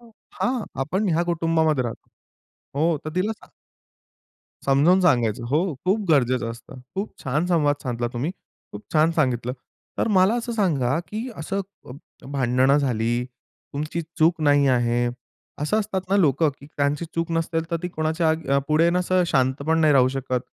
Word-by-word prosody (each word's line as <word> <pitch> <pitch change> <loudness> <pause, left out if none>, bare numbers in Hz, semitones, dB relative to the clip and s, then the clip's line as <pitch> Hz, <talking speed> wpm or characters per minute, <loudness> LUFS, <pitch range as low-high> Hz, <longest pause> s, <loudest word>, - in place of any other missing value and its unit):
हां, 235 +1 -4 0.2
आपण 190 +8 -1
ह्या 170 0 +2
कुटुंबामध्ये 160 -5 +1
राहतोय 115 - -7 0.7
हो, 165 -1 +2
तर 155 - -4
तिला 200 +4 +1
सांग - - -20 1.2
समजावून 145 +7 +4
सांगायचं 120 - +2
हो, 160 +3 +1
खूप 195 +4 +2
गरजेचं 125 -5 +2
असतं. 115 +2 -11
खूप 195 +2 -3
छान 150 +6 0
संवाद 155 -5 +2
साधला 120 -2 -2
तुम्ही. 125 +7 -2 0.4
खूप 105 - -8
छान 155 +1 +4
सांगितलं. 125 -6 0 0.5
तर - - +1
मला 195 +1 +4
असं 235 0 -4
सांगा 160 - +1
की 225 +4 -4
असं 180 +5 -3 0.3
अ, - - -9 0.4
भांडणं 130 +1 +3
झाली. 120 -3 0 0.5
तुमची 150 +4 -3 0.2
चूक 160 +1 +3
नाही 145 -1 +4
आहे. 120 -1 +2 0.5
असं 155 +9 +1
असतात 200 -2 -2
ना 200 - +4
लोकं 155 -4 +3
की 140 - -13
त्यांची 145 +3 0
चूक 165 0 -2
नसेल, 165 0 0
तर 170 - +1
ती 180 - -2
कोणाच्या 160 0 0
आग 160 -3 +1
पुढे 155 +2 +4
ना 180 - +1
असं 180 0 +2
शांत 130 -3 +2
पण 160 0 +2
नाही 155 -2 +4
राहू 130 -2 +5
शकत, 130 -1 -2
155 Hz, 165 wpm, -23 LUFS, 130-175 Hz, 1.2 s, राहू